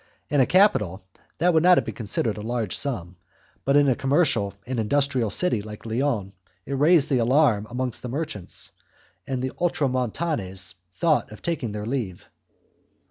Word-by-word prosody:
In 145 Hz, -, +3 dB
a 130 Hz, -, +3 dB
capital 110 Hz, -, +3 dB, 0.3 s
that 175 Hz, +2 st, +3 dB
would 160 Hz, -, +4 dB
not 180 Hz, +1 st, +6 dB
have -, -, +2 dB
been -, -, -4 dB
considered 110 Hz, 0 st, -1 dB
a 105 Hz, -, -7 dB
large 115 Hz, -2 st, -2 dB
sum, 90 Hz, -, -4 dB, 0.5 s
but 140 Hz, -, +2 dB
in 145 Hz, -1 st, +5 dB
a 130 Hz, -, +4 dB
commercial 135 Hz, -, +1 dB
and 125 Hz, -1 st, -3 dB
industrial 130 Hz, 0 st, +1 dB
city 120 Hz, -, +1 dB
like 105 Hz, +1 st, -10 dB
Lyons 115 Hz, -4 st, -1 dB, 0.3 s
it 140 Hz, -, -4 dB
raised 150 Hz, +2 st, +4 dB
the 130 Hz, -, +3 dB
alarm 120 Hz, -3 st, +3 dB
amongst 125 Hz, -1 st, -3 dB
the 125 Hz, -, -5 dB
merchants, 140 Hz, -, -4 dB, 0.6 s
and 130 Hz, -2 st, -2 dB
the 130 Hz, -, -2 dB
Ultramontanes 130 Hz, -, -1 dB, 0.2 s
thought 160 Hz, -8 st, +1 dB
of 105 Hz, -, -12 dB
taking 150 Hz, -10 st, -2 dB
their 105 Hz, 0 st, -5 dB
leave. 115 Hz, -7 st, -4 dB
125 Hz, 165 wpm, -24 LUFS, 105-145 Hz, 0.6 s, not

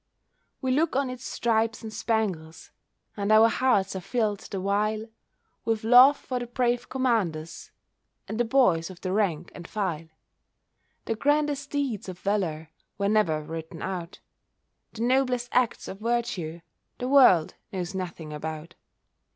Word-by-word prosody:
We 260 Hz, -, +1 dB
look 305 Hz, +3 st, +1 dB
on 270 Hz, -1 st, +1 dB
its 255 Hz, 0 st, -8 dB
stripes 225 Hz, -2 st, 0 dB
and 220 Hz, -1 st, -7 dB
spangles, 205 Hz, -8 st, -2 dB, 0.4 s
And 205 Hz, 0 st, -1 dB
our 220 Hz, +1 st, +7 dB
hearts 215 Hz, -6 st, +1 dB
are -, -, -2 dB
filled 215 Hz, -1 st, -1 dB
the 195 Hz, -, -6 dB
while 210 Hz, +3 st, 0 dB, 0.6 s
With 225 Hz, -1 st, -1 dB
love 250 Hz, +5 st, +8 dB
for 255 Hz, -1 st, -4 dB
the 245 Hz, -, -5 dB
brave 245 Hz, 0 st, 0 dB
commanders, 195 Hz, -12 st, -1 dB, 0.6 s
And 220 Hz, -, -4 dB
the -, -, +4 dB
boys 225 Hz, -10 st, +3 dB
of 185 Hz, -1 st, -12 dB
the 185 Hz, -, -3 dB
rank 180 Hz, -5 st, 0 dB
and 175 Hz, 0 st, -9 dB
file. 175 Hz, -7 st, -3 dB, 1.0 s
The -, -, 0 dB
grandest 290 Hz, +3 st, 0 dB
deeds 255 Hz, -9 st, -2 dB
of 180 Hz, -, -7 dB
valour 170 Hz, -6 st, -2 dB, 0.3 s
Were 200 Hz, 0 st, 0 dB
never 170 Hz, -8 st, +2 dB
written 160 Hz, +1 st, -7 dB
out, 180 Hz, -2 st, -5 dB, 0.8 s
The 230 Hz, 0 st, -4 dB
noblest 250 Hz, -1 st, +1 dB
acts 250 Hz, -2 st, +1 dB
of 195 Hz, -, -7 dB
virtue 215 Hz, -8 st, -2 dB, 0.4 s
The 250 Hz, -, -3 dB
world 250 Hz, -, +6 dB, 0.2 s
knows 185 Hz, -2 st, -4 dB
nothing 170 Hz, -5 st, -5 dB
about. 160 Hz, +2 st, -6 dB
215 Hz, 145 wpm, -26 LUFS, 175-245 Hz, 1.0 s, love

